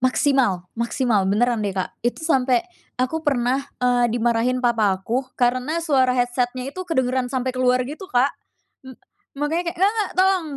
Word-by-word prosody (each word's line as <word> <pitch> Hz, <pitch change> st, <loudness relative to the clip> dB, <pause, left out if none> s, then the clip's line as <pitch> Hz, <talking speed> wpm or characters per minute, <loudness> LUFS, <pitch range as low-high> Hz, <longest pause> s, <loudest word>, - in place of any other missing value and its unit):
Maksimal 255 Hz, -7 st, +2 dB
maksimal, 235 Hz, -4 st, 0 dB
beneran 235 Hz, +2 st, +1 dB
deh, 200 Hz, -2 st, -3 dB
Kak, 185 Hz, -, -2 dB
itu 245 Hz, +6 st, -2 dB
sampe, 260 Hz, -2 st, +2 dB, 0.3 s
aku 255 Hz, +6 st, -1 dB
pernah, 265 Hz, -3 st, +1 dB, 0.2 s
eee, 245 Hz, -1 st, +3 dB
dimarahin 240 Hz, +2 st, 0 dB
papa 215 Hz, -5 st, +2 dB
aku, 245 Hz, +7 st, -3 dB
karena 255 Hz, +5 st, +1 dB
suara 260 Hz, -5 st, +2 dB
headset-nya 245 Hz, +1 st, -1 dB
itu 370 Hz, -, -7 dB
kedengeran 260 Hz, -4 st, 0 dB
sampe 260 Hz, -1 st, -2 dB
keluar 255 Hz, 0 st, +2 dB
gitu 310 Hz, +8 st, -8 dB
Kak. 255 Hz, +3 st, +2 dB, 0.5 s
M 260 Hz, -, -10 dB, 0.4 s
makanya 305 Hz, +4 st, -1 dB
kayak, 345 Hz, -, -18 dB
"Nggak 400 Hz, +2 st, +4 dB
nggak, 425 Hz, -3 st, -1 dB
tolong 375 Hz, -3 st, +3 dB
255 Hz, 160 wpm, -22 LUFS, 240-275 Hz, 0.5 s, Nggak